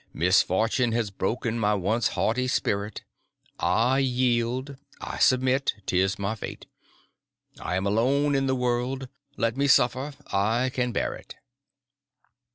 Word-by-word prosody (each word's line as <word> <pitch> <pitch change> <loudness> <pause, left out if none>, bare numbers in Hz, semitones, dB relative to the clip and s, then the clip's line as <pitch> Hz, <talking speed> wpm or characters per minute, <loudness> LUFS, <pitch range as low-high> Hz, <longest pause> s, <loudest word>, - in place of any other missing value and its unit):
Misfortune 105 +7 +2
has 115 -3 -1
broken 115 +3 -2
my 105 -1 +2
once 105 +4 +1
haughty 125 +3 +1
spirit; 100 -4 -1 0.6
I 125 +4 +2
yield, 125 +1 0 0.2
I - - -6
submit; 130 +1 +2
'tis 95 +1 +1
my 100 +2 -2
fate. 110 - -8 0.9
I 90 - -3
am 95 +1 -1
alone 135 +8 +2
in 135 -1 +1
the 130 - +1
world—let 125 -1 -2
me 140 +1 +1
suffer; 130 +2 +3 0.6
can 125 -1 -1
bear - - -1
it." - - -12
120 Hz, 120 wpm, -26 LUFS, 105-130 Hz, 0.9 s, suffer